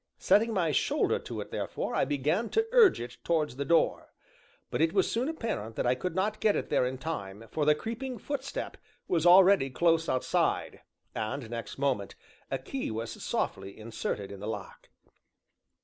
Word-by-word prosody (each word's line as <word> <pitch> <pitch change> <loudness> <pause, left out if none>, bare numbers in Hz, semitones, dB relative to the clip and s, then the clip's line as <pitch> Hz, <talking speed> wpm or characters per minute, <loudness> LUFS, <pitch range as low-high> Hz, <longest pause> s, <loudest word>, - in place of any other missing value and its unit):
Setting 225 +3 +3
my 180 -7 +1
shoulder 140 - +1
to - - -6
it - - -9
therefore, - - -3
I - - +2
began 150 - 0
to 445 0 +2
urge 470 -6 +6
it 120 0 -7
towards 155 -6 0
the 140 - -2
door. 165 +3 +2 0.6
But - - -1
it 160 +1 +3
was 190 -2 +2
soon 245 +6 0
apparent 220 - -4
that - - -1
I 125 - +4
could 165 +7 -4
not 210 +3 0
get 215 -2 +3
it - - -2
there 125 - +3
in 130 +1 -4
time, 115 -9 -5
for 150 - 0
the 150 0 +5
creeping 235 - -5
footstep 280 +1 -4 0.3
was 170 -1 +2
already 185 -4 +7
close 165 +4 +2
outside, 130 - 0 0.3
and, 120 +3 -3
next 115 -2 -5
moment, 135 -8 -1 0.3
a 135 - -1
key 255 - -4
was 115 +1 -4
softly 95 0 -2
inserted 110 -2 -4
in 100 - -8
the 105 - -6
lock. 110 - -7
155 Hz, 180 wpm, -29 LUFS, 120-205 Hz, 0.6 s, already